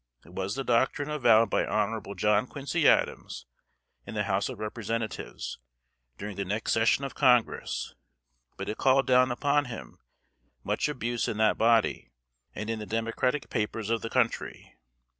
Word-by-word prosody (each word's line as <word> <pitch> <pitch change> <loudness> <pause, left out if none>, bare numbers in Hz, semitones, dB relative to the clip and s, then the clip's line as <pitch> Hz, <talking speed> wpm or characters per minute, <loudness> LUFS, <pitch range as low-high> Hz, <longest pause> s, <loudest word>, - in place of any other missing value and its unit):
It 85 - -16
was 95 +3 -3
the 135 - -3
doctrine 130 +4 +1
avowed 115 -7 +4
by - - +2
Hon. 110 +1 -1
John 105 +2 +2
Quincy 145 +4 0
Adams - - +1 0.6
in - - -9
the 105 - 0
House 100 +2 0
of 130 - -7
Representatives, 110 +1 -4 0.6
during 105 -1 -7
the 100 - -1
next 105 +3 -2
session 115 +4 +3
of 135 - -6
Congress; 125 -4 +1 0.6
but - - -5
it 105 - -4
called 135 +1 +4
down 125 0 +4
upon 145 +3 +1
him 120 -4 -9 0.6
much - - 0
abuse 120 -4 -2
in 105 - -3
that 110 -1 +3
body, 115 - +2 0.5
and 110 - -5
in 115 -1 -2
the 105 - -7
Democratic 115 +4 -1
papers 110 +1 -2
of 115 - +1
the 115 - -4
country. - - -1
115 Hz, 160 wpm, -28 LUFS, 105-130 Hz, 0.6 s, avowed